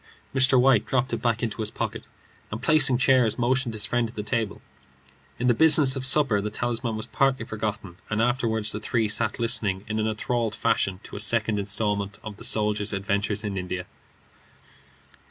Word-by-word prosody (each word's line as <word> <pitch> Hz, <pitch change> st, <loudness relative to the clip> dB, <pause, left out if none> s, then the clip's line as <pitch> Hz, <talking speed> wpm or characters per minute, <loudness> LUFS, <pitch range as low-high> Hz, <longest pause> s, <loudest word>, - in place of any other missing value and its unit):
Mr. 130 Hz, -1 st, +4 dB
White 125 Hz, -4 st, +4 dB
dropped 130 Hz, -1 st, 0 dB
it -, -, -2 dB
back 115 Hz, -1 st, 0 dB
in 115 Hz, -, -1 dB
his 110 Hz, 0 st, -3 dB
pocket, -, -, -5 dB, 0.4 s
and 105 Hz, -, -5 dB
placing 135 Hz, -3 st, +5 dB
chairs, 130 Hz, -3 st, +3 dB
motioned 125 Hz, -1 st, 0 dB
his 105 Hz, +1 st, +1 dB
friend 120 Hz, -1 st, 0 dB
to 115 Hz, -, -11 dB
the 105 Hz, -, -4 dB
table. 110 Hz, -2 st, -2 dB, 0.8 s
In 125 Hz, -, -3 dB
the 125 Hz, -, +4 dB
business 145 Hz, 0 st, +6 dB
of 135 Hz, 0 st, -1 dB
supper 135 Hz, -7 st, +3 dB
the 105 Hz, -, -3 dB
talisman 115 Hz, +1 st, -3 dB
was 110 Hz, -, -5 dB
partly 135 Hz, -4 st, 0 dB
forgotten, 105 Hz, -5 st, -5 dB
and 105 Hz, -, -1 dB
afterward 115 Hz, -2 st, 0 dB
the 105 Hz, 0 st, 0 dB
three 115 Hz, 0 st, -1 dB
sat 110 Hz, +1 st, -1 dB
listening 110 Hz, -4 st, 0 dB
in 110 Hz, 0 st, -2 dB
an 110 Hz, -, 0 dB
enthralled 110 Hz, +1 st, -2 dB
fashion 95 Hz, -3 st, 0 dB
to -, -, -11 dB
a -, -, -5 dB
second 105 Hz, 0 st, 0 dB
instalment 100 Hz, 0 st, -2 dB
of 110 Hz, -2 st, -8 dB
the -, -, -11 dB
soldier's 105 Hz, -1 st, 0 dB
adventures 100 Hz, +2 st, -1 dB
in 100 Hz, -2 st, -4 dB
India. 90 Hz, -1 st, -4 dB
110 Hz, 185 wpm, -25 LUFS, 105-125 Hz, 0.8 s, business